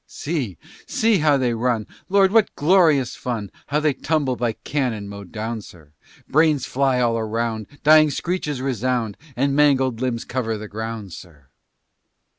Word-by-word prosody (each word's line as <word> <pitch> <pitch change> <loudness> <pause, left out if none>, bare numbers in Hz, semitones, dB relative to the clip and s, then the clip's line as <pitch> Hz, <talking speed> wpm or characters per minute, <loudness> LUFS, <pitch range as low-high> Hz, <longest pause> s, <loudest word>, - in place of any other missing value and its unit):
See! 140 - -4 0.3
see! 220 -3 +2
how 150 -2 +4
they 125 -3 0
run! 115 -2 0 0.2
Lord! 195 0 +4
what 220 -1 +3
glorious 155 -5 +3
fun! 110 -6 -4 0.2
How 145 +1 +1
they 150 -1 +2
tumble, 145 -3 0
by 120 -2 -1
cannon 120 -6 -3
mowed 100 -2 -9
down, 110 0 -4
sir! 80 -7 -15 0.4
Brains 150 -3 +3
fly 135 -1 +1
all 115 -2 +1
around, 110 0 -2 0.2
Dying 155 0 +7
screeches 150 -4 -3
resound, 125 -4 -1 0.2
And 140 +2 +1
mangled 135 -5 +3
limbs 125 -3 -2
cover 115 -4 -2
the 105 0 -7
ground, 110 -3 -6
sir. 75 -7 -13
125 Hz, 150 wpm, -22 LUFS, 110-150 Hz, 0.4 s, Dying